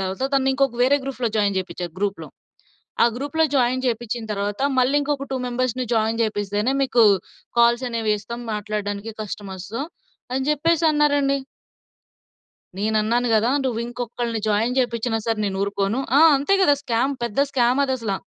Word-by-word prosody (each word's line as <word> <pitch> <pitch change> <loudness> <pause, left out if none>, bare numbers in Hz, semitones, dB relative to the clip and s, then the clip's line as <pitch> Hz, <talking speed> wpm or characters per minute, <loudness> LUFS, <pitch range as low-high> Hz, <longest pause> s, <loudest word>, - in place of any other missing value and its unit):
తరువాత 190 +6 -2
తనని 270 -1 +3
ఇంకొక 270 -2 +1
వేరే 275 +3 +4
గ్రూప్‌లో 255 -3 -2
జాయిన్ 205 -2 +1
చేపించారు. 180 -2 -5
గ్రూప్‌లో 200 0 -2 0.8
ఆ - - +6
గ్రూప్‌లో 290 +5 0
జాయిన్ 255 0 +2
చేపించిన 235 -1 -2
తరువాత 205 +2 -3 0.2
మళ్ళీ, 255 +3 +3
"ఇంకొక 285 -1 -2
టూ 265 - 0
మెంబర్స్‌ని 255 0 -1
జాయిన్ 225 0 +1
చేపిస్తేనే 205 +2 -1
మీకు 245 -3 +3 0.6
కాల్స్ 235 +2 +4
అనేవిస్తాం 230 0 -2
మాట్లాడడానికి 210 0 -4
కస్టమర్స్‌తో" 200 +2 -6 0.5
అని 265 +1 0
చెప్పేసి 325 +3 +1
అన్నారండి. 285 -2 +2 1.4
నేనన్నాను 220 +3 +1
కదా! 220 +3 +3
"నువ్వు 240 -3 -1
ఇంకొకళ్ని 240 -1 -4
జాయిన్ 225 +4 +1
చేపించినా 235 -2 0
సరే! 225 -1 0
నేను 190 -1 -3
ఊరుకోను" 200 +4 -1 0.2
ఆ! - - +6 0.2
అంతే 290 +9 +2
కదా! 290 -6 +5
స్కామ్ 245 +4 0
పెద్ద 235 +2 -1
స్కామ్ 250 +1 +2
అదసల. 255 -6 -2
235 Hz, 140 wpm, -22 LUFS, 210-265 Hz, 1.4 s, ఆ